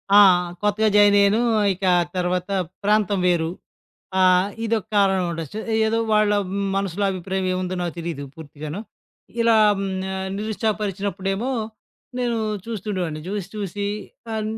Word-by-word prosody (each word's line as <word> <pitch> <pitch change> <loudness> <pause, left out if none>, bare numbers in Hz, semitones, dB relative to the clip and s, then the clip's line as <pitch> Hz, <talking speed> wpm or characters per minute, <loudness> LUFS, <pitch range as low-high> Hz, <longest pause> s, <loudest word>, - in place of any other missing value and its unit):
ఆ! - - +9 0.5
కొత్తగా 210 +1 +2
జాయినయ్యాను. 205 +1 +5 0.3
ఇక 190 +1 -5 0.3
తర్వాత 180 +1 -1 0.3
ప్రాంతం 205 -1 +2
వేరు. 165 -2 +2 0.7
ఆహ్, 185 +1 +5 0.2
ఇదొక 225 -2 0
కారణం 195 -2 +3
ఉండొచ్చు. 165 +3 -5 0.3
ఏదో 225 +1 +1
వాళ్ళ 210 -1 +4 0.4
మనసులో 195 0 -1
అభిప్రాయం 190 +1 -3
ఏముందో 185 0 -2
నాకు 175 -1 -3
తెలీదు 165 -4 -4
పూర్తిగాను. 155 +2 -7 0.6
ఇలా 230 -1 +5 0.2
హ్మ్. 195 - -2 0.2
ఆహ్, 190 0 -3
నిరుత్సాహపరిచినప్పుడేమో 205 0 -2 0.7
నేను 240 -2 0 0.3
చూస్తుండేవాడిని. 185 -8 -3
చూసి, 200 -2 -4
చూసి 205 -1 -3 0.5
ఆహ్, 220 -1 -2
195 Hz, 115 wpm, -22 LUFS, 180-210 Hz, 0.7 s, ఆ